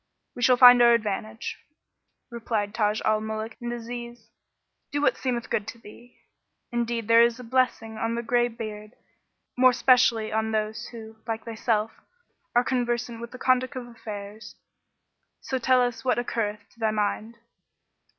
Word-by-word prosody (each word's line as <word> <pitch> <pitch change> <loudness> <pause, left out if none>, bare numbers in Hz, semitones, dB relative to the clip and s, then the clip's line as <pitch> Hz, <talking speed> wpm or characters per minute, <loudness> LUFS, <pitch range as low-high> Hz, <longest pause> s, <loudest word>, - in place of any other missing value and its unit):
we 245 - -7
shall 250 +1 +5
find 245 -1 +9
our 235 0 +7
advantage." 215 0 -4 0.7
Replied 220 -3 -2
Taj 215 -1 0
al 215 0 +2
Muluk 220 +1 -5
and 240 0 -4
Aziz, 240 0 -7 0.6
"Do 290 - -1
what 290 - +2
seemeth 245 -3 -3
good 210 - -1
to 240 - -7
thee, 235 +2 -16 0.5
indeed 235 -2 -2
there 230 0 +7
is 235 +1 +3
a - - -8
blessing 235 -2 0
on 230 +1 -1
the 235 - -3
grey 240 +1 +2
beard; 215 -1 -8 0.6
more 255 0 +5
specially 240 -3 +3
on 220 0 0
those 215 +1 -2
who, 220 -2 -11
like 225 -1 -4
thyself, 225 -1 -1 0.6
are 245 - +5
conversant 240 -2 -2
with 235 - -6
the 255 - -10
conduct 255 +2 +1
of 255 -1 -5
affairs: 215 -2 -9 0.8
so 260 - -3
tell 255 +1 +3
us 235 -2 -3
what 255 - +1
occurreth 210 -3 -3
to 235 - -26
thy 220 -1 +1
mind." 215 +2 -2
230 Hz, 160 wpm, -26 LUFS, 220-245 Hz, 0.8 s, find